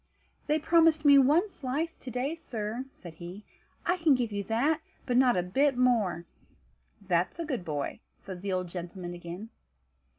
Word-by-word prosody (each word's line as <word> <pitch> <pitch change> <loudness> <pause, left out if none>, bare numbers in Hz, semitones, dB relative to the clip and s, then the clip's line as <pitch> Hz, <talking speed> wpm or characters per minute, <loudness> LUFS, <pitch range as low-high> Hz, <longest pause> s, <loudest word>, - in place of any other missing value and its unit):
"They 305 +1 +3
promised 320 -1 +4
me 285 -1 +8
one 300 +9 +4
slice 315 -1 -3
to 260 - -9
day, 250 +5 -2
sir," 235 -6 -5
said 175 -10 -12
he; 175 +5 -9 0.4
"I 355 - +2
can 325 -5 +4
give 240 -3 -1
you 200 0 -2
that, 280 +9 +1 0.2
but 250 - 0
not 250 -4 +5
a 180 - +1
bit 265 +9 +2
more." 220 -9 +2 0.7
"That's 185 - 0
a 335 - -3
good 260 - -3
boy," 145 -4 -3 0.2
said 185 -2 -9
the 200 0 -3
old 185 -1 -1
gentleman 175 0 -6
again. 175 +6 -8
240 Hz, 170 wpm, -29 LUFS, 180-290 Hz, 0.7 s, me